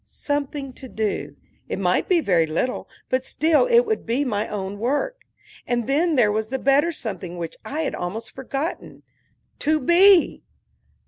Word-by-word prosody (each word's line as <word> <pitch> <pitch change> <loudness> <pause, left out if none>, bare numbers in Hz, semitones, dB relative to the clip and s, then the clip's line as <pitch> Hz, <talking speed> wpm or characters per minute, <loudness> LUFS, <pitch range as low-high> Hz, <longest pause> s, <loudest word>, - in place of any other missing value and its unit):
Something 285 -2 -4
to 260 - -9
do; 215 -3 -3 0.3
it - - -2
might - - +1
be 355 -3 +4
very 170 - +2
little, 165 +11 -2 0.2
but 255 0 0
still 315 - +2
it 475 -1 +6
would 440 -2 -2
be 245 +5 0
my 215 -3 -1
own 200 -1 -5
work. - - -2 0.4
And 240 -1 0
then 310 +5 +2
there 225 -6 +4
was 215 +1 -2
the 265 - -1
better 280 +5 +3
something 195 - -5
which 170 -2 -5
I 305 +3 -3
had 300 - -2
almost 220 +6 -5
forgotten 275 +5 -5 0.6
to 310 +1 +2
be! 350 +5 +5
265 Hz, 165 wpm, -23 LUFS, 215-315 Hz, 0.6 s, it